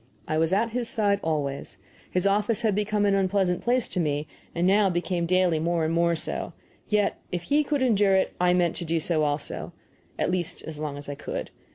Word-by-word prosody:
I 155 0 0
was 165 +1 +2
at 220 +4 +2
his 240 0 -2
side 205 -3 +2
always. 140 -9 -2 0.3
His 180 0 0
office 210 +2 +2
had 220 -3 +2
become 210 +1 +1
an 200 - +3
unpleasant 190 -2 +1
place 245 0 +1
to 180 - -2
me, 150 -2 -1 0.3
and 170 +1 +1
now 200 +1 +4
became 175 -1 -1
daily 180 -2 +3
more 165 0 0
and 160 - 0
more 170 0 +3
so. 160 - -4 0.3
Yet 210 -1 +1
if 175 -1 -3
he 290 - +2
could 290 -2 0
endure 205 -5 +4
it 190 - +1
I 180 0 +4
meant 175 -2 +2
to - - -4
do 165 +1 0
so 160 0 0
also 145 0 -2 0.4
at - - 0
least, 180 -1 -2
as 155 -2 -7
long 150 -2 -4
as 145 - -9
I 145 - -3
could. 145 - -5
180 Hz, 215 wpm, -26 LUFS, 160-205 Hz, 0.4 s, now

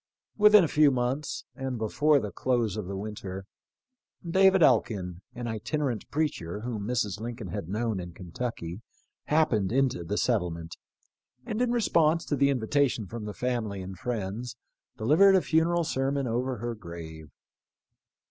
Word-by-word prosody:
Within 210 -2 +7
a - - +2
few 150 0 +5
months, 130 +3 -2
and 130 -1 -4
before 145 +7 +3
the 105 -4 -5
close 120 -6 0
of 105 -4 -4
the 95 0 -4
winter, 95 -2 -6 0.8
David 190 +1 +5
Elkin, 90 - +2
an 120 0 -5
itinerant 120 +2 -2
preacher 105 - -2
whom 110 -3 -4
Mrs. 105 -4 -1
Lincoln 115 -4 -6
had 85 - -5
known 110 0 -1
in 90 -1 -6
Kentucky, 90 +1 -6 0.4
happened 120 -11 +2
into 130 -8 +1
the 100 +5 -3
settlement, 85 -8 -1 0.7
and 220 +2 -2
in 250 - +2
response 165 -8 +2
to 145 - 0
the 140 0 +3
invitation 130 -2 +1
from 110 +2 -7
the 105 - -5
family 115 -5 -2
and 95 -1 -8
friends, 115 +1 -4 0.4
delivered 160 - +5
a 190 - +5
funeral 170 +1 +2
sermon 135 -1 -1
over 125 +2 -1
her 120 +2 -3
grave. 85 -6 -9
120 Hz, 145 wpm, -28 LUFS, 100-145 Hz, 0.8 s, Within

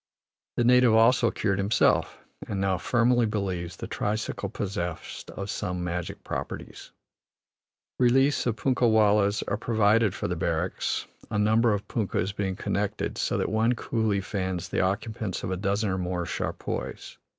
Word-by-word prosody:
The 120 - +3
native 125 -1 +5
also 115 +1 +5
cured 100 -2 -1
himself, 100 +3 +2 0.3
and 100 - -3
now 95 -2 +1
firmly 120 +3 +3
believes 95 -5 -3
the 115 - -6
tricycle 110 -1 -2
possessed 90 -4 -4
of 100 +1 -5
some 90 -1 -3
magic 90 -1 -4
properties. - - -6 1.1
Reliefs 135 +2 +3
of 115 - +1
punkah 125 0 +2
wallahs 105 -1 +3
are 100 - 0
provided 110 -2 +2
for - - -3
the - - -2
barracks, - - -1 0.2
a 105 - -2
number 110 +3 +3
of 105 0 -2
punkahs 100 -3 -1
being 95 -2 -1
connected 100 +2 -2
so - - 0
that - - 0
one 110 +3 +2
coolie 110 -4 -1
fans 95 -3 -3
the - - 0
occupants 100 +1 -2
of - - -2
a - - 0
dozen 100 +2 0
or 95 - -1
more 90 -1 -2
charpoys. - - -4
105 Hz, 150 wpm, -27 LUFS, 95-115 Hz, 1.1 s, native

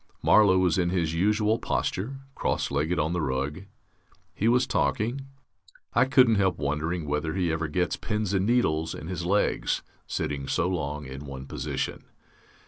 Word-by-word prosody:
Marlow 100 -3 +6
was 90 -1 +2
in 85 -1 +2
his 85 -3 0
usual 105 +5 +2
posture, 135 +9 -2
cross - - -1
legged 75 +5 0
on 80 +2 0
the 90 - 0
rug. 70 +6 -2 0.7
He 110 - 0
was 125 +2 +4
talking.... 115 - -1 0.7
I - - +4
couldn't 130 -4 +5
help 95 -2 +1
wondering 75 +4 -2
whether 75 +2 -2
he 90 -3 +1
ever 80 -1 -1
gets 90 +4 -1
pins 105 -3 -2
and 95 +1 +1
needles 80 -10 +1
in 75 - -8
his 90 -2 -3
legs, 100 +3 +1 0.2
sitting 70 -2 -3
so 85 - +1
long 75 -5 -3
in 70 +2 -8
one 65 -1 -7
position. - - -4
90 Hz, 160 wpm, -27 LUFS, 75-105 Hz, 0.7 s, Marlow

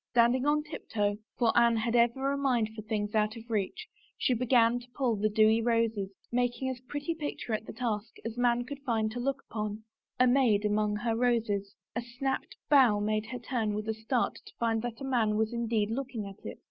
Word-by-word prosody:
Standing 245 +3 +4
on 300 +1 +3
tiptoe 210 -9 -2
— - - -55
for 235 -2 +2
Anne 235 -1 +5
had 230 +2 0
ever 240 +4 +3
a - - 0
mind 255 -6 +1
for 215 - -6
things 210 -1 -2
out 215 0 +1
of 230 0 -10
reach 220 - -2
— - - -33
she 255 - +2
began 240 0 +3
to 245 0 -15
pull 250 -5 +1
the 215 +1 +1
dewy 220 +1 +4
roses, 225 -4 +1 0.2
making 245 +2 0
as 250 - -6
pretty 290 +4 -2
picture 295 -7 -4
at 215 0 -2
the - - -5
task, 225 -3 -3
as 225 0 -4
man 245 0 +2
could 280 +3 -7
find 225 -6 0
to 245 - -5
look 275 +2 -2
upon 215 0 -4 0.2
— - - -50
a 255 - +6
maid 245 -5 +3
among 210 0 +1
her 225 +2 -1
roses. 225 -5 0 0.2
A 240 - 0
snapped 245 +3 -3
bough 255 -8 +5
made 215 +1 0
her 250 - -5
turn 230 -3 -2
with 215 +1 -4
a 220 - 0
start 220 +3 -1
to - - -13
find 225 -1 +1
that 240 +1 -5
a - - -4
man 235 -5 +1
was 220 +2 0
indeed 225 -2 0
looking 245 -3 -3
at 195 0 -11
it. - - -7
230 Hz, 225 wpm, -30 LUFS, 215-250 Hz, 0.2 s, a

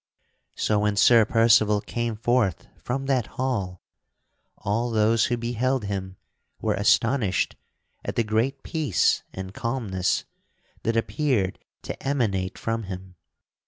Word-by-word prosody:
So 105 -1 +1
when 105 0 +1
Sir 115 +2 +6
Percival 110 -2 +4
came 120 +2 -3
forth 115 -5 +1
from 135 +2 -4
that 130 -4 +1
hall, 100 -9 -2 0.7
all 115 +5 -1
those 110 0 +3
who 120 - 0
beheld 120 +2 -1
him 95 -2 -4 0.4
were 110 -1 0
astonished 110 +1 +2 0.5
at - - -4
the 115 - +2
great 115 +6 0
peace 155 - +1
and 95 0 -7
calmness 110 -7 -1 0.6
that 115 0 0
appeared 115 - 0 0.2
to - - -6
emanate 110 -10 -1
from 115 -1 -2
him. 95 -1 -7
115 Hz, 125 wpm, -25 LUFS, 100-120 Hz, 0.7 s, Sir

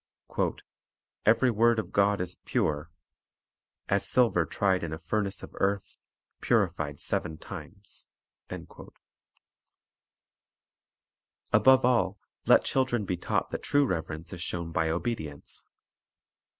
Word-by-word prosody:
"Every 115 +3 +5
word 115 +1 +3
of 110 - -3
God 100 -1 +2
is 90 -1 -3
pure;" 75 +2 -1 1.0
"as 100 0 +2
silver 115 -10 +3
tried 95 -3 +1
in 80 -2 -3
a - - -4
furnace 100 +4 -2
of - - -9
earth, 100 0 -1 0.4
purified 85 -10 0
seven 80 - -1
times." 100 +4 -10 0.4
1 - - -6 2.9
Above 130 -1 +6
all, 115 -6 +2 0.3
let - - +6
children 125 -5 +1
be 95 - -1
taught 85 - -2
that - - -3
true 145 0 +3
reverence 80 - -4
is 90 - -7
shown 85 -1 -3
by 80 0 +1
obedience. 80 -5 -4
95 Hz, 110 wpm, -28 LUFS, 85-115 Hz, 2.9 s, Above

